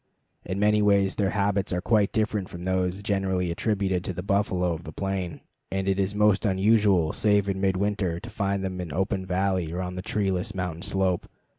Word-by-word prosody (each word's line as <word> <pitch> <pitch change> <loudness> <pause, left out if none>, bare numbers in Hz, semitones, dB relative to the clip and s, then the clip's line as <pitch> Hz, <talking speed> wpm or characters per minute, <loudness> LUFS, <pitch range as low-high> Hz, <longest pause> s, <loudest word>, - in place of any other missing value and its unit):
In 95 - -4
many 105 +1 +3
ways 100 -2 +3
their 100 -2 0
habits 100 -1 0
are 90 - 0
quite 105 +1 +2
different 105 -3 -1
from 85 0 -8
those 95 +1 -1
generally 95 -4 0
attributed 95 -1 0
to 95 - -3
the 90 - -5
buffalo 95 -3 +1
of 80 +1 -7
the 80 - -8
plain, 95 0 -3 0.3
and 95 0 -1
it 95 0 +1
is 100 +1 0
most 105 -2 +3
unusual, 100 -4 +3
save 105 -1 +2
in 95 -1 -2
midwinter, 95 -2 0
to 115 - -9
find 100 -2 -1
them 95 -1 -3
in 85 -4 -6
open 95 +3 -1
valley 95 -2 0
or 90 - -3
on 90 0 -3
the 90 - -4
treeless 100 +1 -1
mountain 90 -3 -3
slope. 95 -1 0
95 Hz, 195 wpm, -26 LUFS, 90-100 Hz, 0.3 s, many